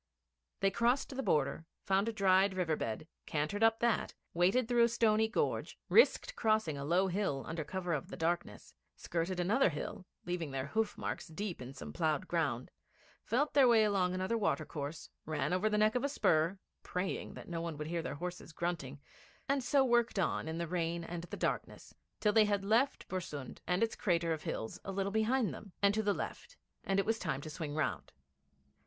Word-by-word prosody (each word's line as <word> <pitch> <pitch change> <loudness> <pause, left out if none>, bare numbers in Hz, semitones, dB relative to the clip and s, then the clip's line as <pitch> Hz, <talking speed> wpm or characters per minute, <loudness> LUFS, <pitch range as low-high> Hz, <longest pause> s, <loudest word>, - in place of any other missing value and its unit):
They 195 0 +3
crossed 245 +6 +1
the 270 - -1
border, 150 - 0 0.2
found 195 +3 +2
a - - -1
dried 195 -2 +3
river 170 -4 +1
bed, 115 +4 -4 0.2
cantered 155 +8 -1
up 225 0 +4
that, 235 -2 +1 0.2
waited 190 +8 +3
through 240 -1 +3
a 235 - +6
stony 220 -1 +3
gorge, 220 - -1
risked - - +4
crossing 215 -9 +1
a 140 - -5
low 175 +6 +3
hill 185 -7 -1
under 165 -1 -3
cover 180 +2 -3
of 150 - -2
the - - -8
darkness, 170 +2 -2 0.2
skirted 175 +2 -2
another 205 +8 +3
hill, 185 +5 -6 0.2
leaving 175 -3 -2
their 135 -1 -3
hoof 220 +8 -1
marks - - -4
deep 180 0 -5
in 130 +2 -8
some - - -8
ploughed 155 -4 0
ground, 140 -8 -1 0.5
felt 280 +7 +1
their 275 -3 +6
way 230 -2 +6
along 190 -3 +2
another 190 +5 0
watercourse, 155 -6 -2 0.2
ran 155 +3 -1
over 195 +4 +2
the 210 - +1
neck 215 +1 +4
of 250 - 0
a 280 - +1
spur, 165 - +2 0.2
praying 180 +1 -3
that - - -9
no 170 -1 -3
one 165 -3 -4
would 150 - -4
hear 170 +1 -2
their 160 - -4
horses 175 +1 -6
grunting, 155 -5 -3 0.5
and 275 -1 +1
so 270 +2 +4
worked 240 -3 +2
on 175 -4 0
in 160 +1 -3
the 170 0 -2
rain 170 0 -1
and 170 0 -5
the - - -7
darkness, - - -3 0.3
till 210 -1 +2
they 220 -1 +6
had 200 -1 0
left 230 +7 +2
Bersund 150 -8 -5
and 180 +5 +2
its 225 - 0
crater 170 -3 +1
of 155 - -5
hills 110 - -4
a 195 - -4
little 195 +1 -1
behind 220 +2 +1
them, 200 -4 -10
and 200 0 +4
to 220 - +1
the 205 -1 +2
left, - - -6 0.3
and 195 0 +1
it 195 - +1
was 225 0 0
time 135 +1 -2
to 155 - -7
swing 150 -2 -5
round. 155 - -2
185 Hz, 200 wpm, -34 LUFS, 160-220 Hz, 0.5 s, a